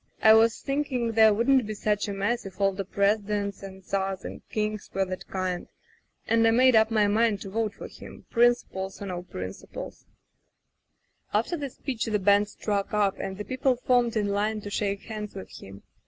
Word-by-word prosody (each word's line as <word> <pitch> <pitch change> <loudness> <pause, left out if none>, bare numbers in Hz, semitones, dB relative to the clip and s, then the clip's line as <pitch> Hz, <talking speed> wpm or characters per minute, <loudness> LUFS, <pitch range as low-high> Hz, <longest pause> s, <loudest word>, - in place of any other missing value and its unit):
I 220 - +9
was 225 +1 +4
thinking 275 -4 -1
there 220 -1 +6
wouldn't 240 +2 +3
be 215 - -4
such 210 0 0
a - - -3
mess 205 +5 -1
if 190 -2 -10
all 195 0 +3
the 195 +1 -4
presidents 200 0 0
and 190 -1 -10
czars 195 -1 -2
and - - -7
kings 215 -1 -2
were 195 0 0
that 185 0 -6
kind, 185 -2 -3 0.6
and 225 0 +3
I - - +6
made 250 +2 +5
up 220 0 +5
my 215 -2 +3
mind 215 0 +2
to 195 - -7
vote 220 0 -1
for - - -8
him, - - -12
principles 235 -5 +1
or 200 - -6
no 180 -2 -4
principles. 95 - -8 1.3
"After 230 +11 +1
the 285 -4 -4
speech 250 -2 -4
the 215 -2 +1
band 205 +1 +4
struck 205 0 -2
up, 205 -2 +1
and 190 0 -4
the 210 - -5
people 260 0 +1
formed 245 -1 +1
in 205 -1 0
line 210 +2 0
to 205 - -7
shake 200 -1 -1
hands 210 -2 -6
with 190 - -8
him. 95 +1 -12
210 Hz, 195 wpm, -27 LUFS, 195-230 Hz, 1.3 s, I